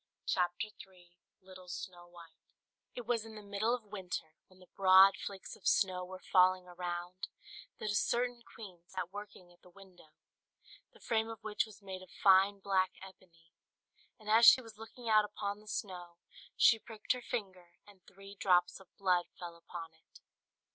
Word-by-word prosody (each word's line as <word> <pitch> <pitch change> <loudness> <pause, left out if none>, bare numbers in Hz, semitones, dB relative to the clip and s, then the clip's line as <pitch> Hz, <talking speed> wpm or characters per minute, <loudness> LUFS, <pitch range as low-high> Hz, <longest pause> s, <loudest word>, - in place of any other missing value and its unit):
LITTLE 185 -1 -13
SNOW 175 0 -8
WHITE 170 -2 -15 0.6
It 245 - -6
was 230 -1 0
in 225 -1 -11
the 210 - -9
middle 205 +4 0
of 245 - -9
winter, 185 -6 -6
when 185 - -22
the 185 - -16
broad 190 0 +7
flakes 195 -2 -7
of - - -7
snow 185 -2 +2
were 185 +1 -8
falling 185 0 +5
around, 180 +1 -5 0.5
that 215 - -3
a - - -1
certain 240 +3 0
queen 195 -7 -12
sat 185 -2 -5
working 200 -3 -10
at 175 - -28
the 180 - -18
window, 180 -4 -18 0.8
the 465 - -20
frame 225 - 0
of 225 -2 -9
which 215 0 -1
was 210 -1 -16
made 190 -1 -7
of 185 - -14
fine 195 +2 +4
black 190 -1 +1
ebony; 170 -3 -16 0.7
and 215 - -15
as 225 +2 +6
she - - +10
was 225 -4 -12
looking 230 +2 -10
out 215 -1 +5
upon 205 0 -4
the 215 - -19
snow, 180 -4 -6 0.4
she 230 -3 +6
pricked 220 -1 -5
her 250 - 0
finger, 190 -8 -6
and 200 -2 -18
three 195 +1 -13
drops 180 -3 +2
of 190 - -17
blood 180 -3 +2
fell 175 -1 -7
upon 170 -1 -9
it. 160 - -21
190 Hz, 170 wpm, -33 LUFS, 180-215 Hz, 0.8 s, she